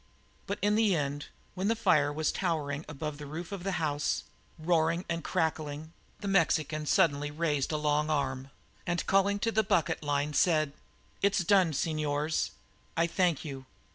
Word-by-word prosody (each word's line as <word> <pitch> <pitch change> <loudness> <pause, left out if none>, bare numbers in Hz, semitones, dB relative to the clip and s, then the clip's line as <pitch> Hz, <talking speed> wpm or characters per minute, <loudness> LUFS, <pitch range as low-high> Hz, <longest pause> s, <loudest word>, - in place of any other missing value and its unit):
But 200 - -2
in 205 0 +3
the 215 -3 +3
end, 145 -1 -2 0.3
when 185 +2 -2
the 225 - +2
fire 145 -9 +3
was 155 +1 0
towering 155 -5 -2
above 150 0 -5
the 145 - -7
roof 165 +5 -6
of 195 -3 -5
the 195 0 -1
house, 150 -3 0 0.3
roaring 165 +1 +1
and 170 -1 -2
crackling, 155 0 -2 0.3
the 205 - -4
Mexican 155 -5 +1
suddenly 145 -5 +3
raised 150 -2 -1
a 155 - 0
long 150 0 +1
arm 135 -3 -1 0.4
and 175 0 0
called 200 +1 +2
to 230 - +2
the 220 - +3
bucket 170 -5 +1
line, 145 0 0
"It 155 -5 +2 0.5
is 200 0 +3
done. 190 -3 +4
Señors, 155 0 0 0.5
I 165 - +4
thank 170 -2 +1
you." 135 -3 -7
155 Hz, 165 wpm, -30 LUFS, 145-180 Hz, 0.5 s, done